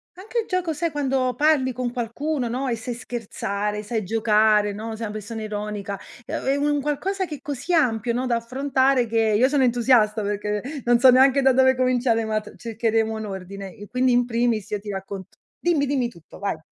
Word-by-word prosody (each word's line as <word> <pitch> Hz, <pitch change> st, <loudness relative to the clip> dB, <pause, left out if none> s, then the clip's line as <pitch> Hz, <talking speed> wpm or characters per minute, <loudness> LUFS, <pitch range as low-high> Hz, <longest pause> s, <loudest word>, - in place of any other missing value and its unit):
anche 430 Hz, +6 st, -4 dB
il -, -, -9 dB
gioco, 360 Hz, -3 st, -1 dB
sai, 330 Hz, +2 st, -2 dB
quando 265 Hz, -3 st, 0 dB
parli 295 Hz, -4 st, +3 dB
con 245 Hz, 0 st, -3 dB
qualcuno, 250 Hz, +2 st, -2 dB
no, 260 Hz, +3 st, -2 dB
e 235 Hz, -, 0 dB
sei 235 Hz, +2 st, -5 dB
scherzare, 210 Hz, -3 st, -4 dB
sai 215 Hz, 0 st, -3 dB
giocare, 215 Hz, 0 st, +3 dB
no, 220 Hz, +2 st, -6 dB
sei 225 Hz, +1 st, -6 dB
una 210 Hz, -, -4 dB
persona 215 Hz, +1 st, -6 dB
ironica, 210 Hz, -1 st, -4 dB, 0.3 s
è -, -, -4 dB, 0.2 s
u 285 Hz, -, 0 dB
è -, -, +2 dB
un 290 Hz, -1 st, +1 dB
qualcosa 375 Hz, +7 st, -1 dB
che 300 Hz, -4 st, -7 dB
così 290 Hz, +4 st, -4 dB
ampio, 235 Hz, -7 st, +2 dB
no, 255 Hz, +2 st, -1 dB
da 240 Hz, -, +2 dB
affrontare 260 Hz, +1 st, +1 dB
che 225 Hz, +1 st, -1 dB, 0.2 s
io 255 Hz, +3 st, +5 dB
sono 280 Hz, -2 st, +2 dB
entusiasta 235 Hz, -3 st, +3 dB
perché 210 Hz, 0 st, -2 dB, 0.2 s
non 240 Hz, 0 st, +4 dB
so 260 Hz, 0 st, +8 dB
neanche 265 Hz, +2 st, +5 dB
da 265 Hz, -1 st, +5 dB
dove 260 Hz, 0 st, +5 dB
cominciare, 245 Hz, -3 st, +2 dB
ma 215 Hz, -1 st, 0 dB
t 210 Hz, -, -13 dB
cercheremo 225 Hz, -1 st, 0 dB
un 220 Hz, 0 st, -5 dB
ordine. 195 Hz, 0 st, -7 dB
E 205 Hz, 0 st, -11 dB
quindi 250 Hz, 0 st, +1 dB
in 245 Hz, 0 st, +3 dB
primis 235 Hz, -3 st, 0 dB
io 210 Hz, -, -1 dB
ti 210 Hz, -, -8 dB
raccont 195 Hz, 0 st, -6 dB, 0.3 s
dimmi, 325 Hz, -5 st, +1 dB
dimmi 260 Hz, -4 st, 0 dB
tutto, 170 Hz, -2 st, -15 dB
vai. 200 Hz, -6 st, -3 dB
240 Hz, 205 wpm, -23 LUFS, 215-265 Hz, 0.3 s, so